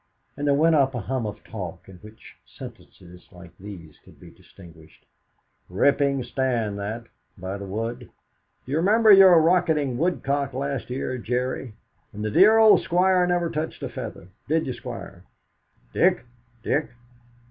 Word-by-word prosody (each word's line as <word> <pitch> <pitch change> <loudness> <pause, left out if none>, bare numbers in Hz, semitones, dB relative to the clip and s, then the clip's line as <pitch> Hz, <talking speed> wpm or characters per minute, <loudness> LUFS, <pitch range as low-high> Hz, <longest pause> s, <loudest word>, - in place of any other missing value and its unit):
And 145 +1 -3
there 140 - +3
went 160 +3 +3
up 135 -3 +2
a 120 - -3
hum 125 +2 -3
of 105 - -8
talk 95 -6 -8
in 95 -2 -13
which 105 +4 -15
sentences 90 0 -14
like 90 -1 -15
these 90 -6 -11
could - - -19
be - - -14
distinguished: 85 -4 -18 0.6
"Rippin' 140 +7 +1
stand 120 -5 -2
that, 110 +4 -5 0.3
by 95 +2 -6
the 100 - -7
wood. 115 +5 -5 0.6
D'you 140 +4 -2
remember 215 +6 +4
your 190 -3 +8
rockettin' 160 -6 +1
woodcock 140 -5 -1
last 140 -1 -4
year, 130 0 -4
Jerry?" 125 0 -3 0.4
"And 105 +1 -5
the 110 - -2
dear 210 - +6
old 220 -1 +6
Squire 180 +1 +2
never 175 -1 0
touched 160 0 -5
a - - -3
feather! 90 - -8 0.2
Did 160 +2 +1
you, 130 - -3
Squire?" 100 -8 -9 0.7
"Dick - - +2 0.4
Dick! 150 +2 -1
130 Hz, 150 wpm, -24 LUFS, 105-160 Hz, 0.7 s, your